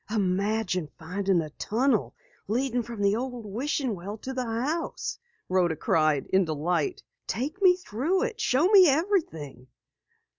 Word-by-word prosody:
"Imagine 200 -3 0
finding 185 +2 0
a 155 -2 -7
tunnel 250 - 0 0.3
leading 245 +2 0
from 230 -3 -5
the 200 +1 +3
old 245 -1 -4
wishing 255 +4 -2
well 200 +3 -6
to 265 +4 -6
the 255 -1 -2
house!" 255 +9 -3 0.3
Rhoda 180 -3 +2
cried 155 -2 +2
in 190 0 +5
delight. 170 - -1 0.2
"Take 300 - -3
me 365 -2 +7
through 355 - -1
it! 465 -2 -3
Show 275 +8 +3
me 390 -4 +8
everything!" 270 - -1
225 Hz, 140 wpm, -27 LUFS, 185-275 Hz, 0.3 s, me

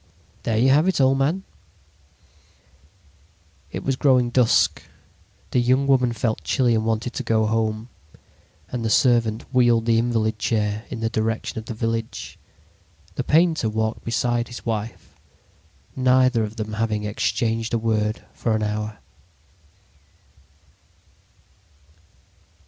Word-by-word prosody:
"There 110 -2 -1
you 125 +4 +4
have 150 +6 +4
it, 190 - +1
old 135 0 +3
man." 160 +8 0 2.3
It - - -5
was 135 - 0
growing 130 -3 +3
dusk. 120 -2 +3 0.7
The - - +2
young 130 +3 +2
woman 130 -3 +3
felt 115 -1 -2
chilly 125 -4 +2
and 110 -1 +1
wanted 115 +2 -1
to - - -3
go 110 -3 +1
home, 110 0 -1 0.8
and 125 -2 -4
the 110 - 0
servant 115 -1 +2
wheeled 120 -3 +3
the 115 -1 +3
invalid 110 -2 0
chair 105 0 -1
in 115 - -6
the 115 - 0
direction 110 0 -2
of 110 - -10
the 115 - -6
village. 115 0 -4 0.7
The 130 - -3
painter 160 -5 +2
walked 110 +1 -2
beside 120 0 0
his 120 - -10
wife, 110 -1 -4 0.8
neither 130 -2 +3
of 105 +1 -5
them 110 -1 -5
having 105 -1 -1
exchanged 110 +2 -1
a 115 - +1
word 110 -1 -1
for 115 -2 -1
an 110 - -1
hour. 105 0 -3
115 Hz, 130 wpm, -23 LUFS, 110-125 Hz, 2.3 s, you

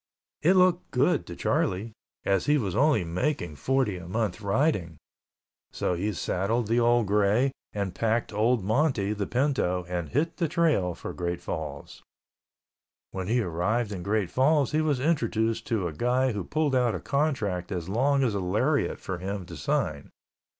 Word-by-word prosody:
It 180 +5 +4
looked 180 -1 +3
good 140 +5 +1
to 85 - -7
Charlie, 95 +7 0 0.3
as 95 -2 +1
he 150 +1 +4
was 100 -9 -2
only 140 -5 +3
making 85 - -2
forty 130 - 0
a 90 -1 -9
month 105 0 -2
riding, 100 - 0 0.7
so - - -1
he 95 +5 -1
saddled 105 +5 -1
the 115 +3 +2
old 120 -1 +3
gray 105 +6 +2 0.2
and 100 -3 -3
packed 115 +3 0
old 110 +1 +2
Monty, 110 -2 +1
the 100 -2 -3
pinto, 120 -9 0
and 90 -3 -3
hit 160 +5 -1
the 170 - +1
trail 150 - +1
for - - -7
Great 85 -1 -3
Falls. - - -6 1.1
When 95 -1 -4
he 120 +3 +2
arrived 100 +6 -1
in 95 -3 -5
Great 100 -1 -1
Falls 140 +1 +3
he 155 +1 +2
was 150 -4 +1
introduced 115 -7 0
to 105 -6 0
a 80 - -5
guy 125 - +1
who 100 -5 -4
pulled 155 -2 0
out 125 -3 +2
a - - -3
contract 110 - -1
as 90 -3 -3
long 135 +7 +2
as 120 -5 +1
a 100 - -1
lariat 90 -1 0
for 95 -2 -5
him 95 0 -4
to 85 - -9
sign. 70 - -2
110 Hz, 170 wpm, -27 LUFS, 95-135 Hz, 1.1 s, It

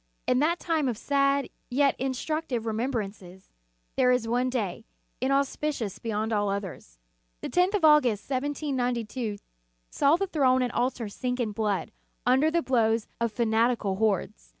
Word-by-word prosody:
In 250 - +2
that 330 +4 +2
time 320 -5 0
of 230 - -3
sad, 275 +1 +1 0.2
yet 275 +2 +2
instructive 265 -1 -2
remembrances, 215 -5 -4 0.5
there 255 -1 +4
is 250 -2 +1
one 245 +2 +1
day, 225 -4 -3 0.4
inauspicious 275 -4 -1
beyond 220 0 -2
all 205 -1 +1
others. 190 - -5 0.4
The - - -4
tenth 360 +3 +2
of 370 -6 +2
August, 255 -9 +4
1792, 255 -5 -2 0.5
saw 285 +3 +4
the 390 +3 0
throne 260 -7 +2
and 245 - -1
altar 245 -2 -1
sink 250 +5 -3
in 230 -3 -1
blood, 205 -2 -1 0.3
under 265 +5 +4
the 335 +1 0
blows 225 -3 +2
of 235 -1 0
fanat 230 +1 +2
ical 195 -3 -3
hordes. 190 - -1
250 Hz, 150 wpm, -27 LUFS, 220-275 Hz, 0.5 s, there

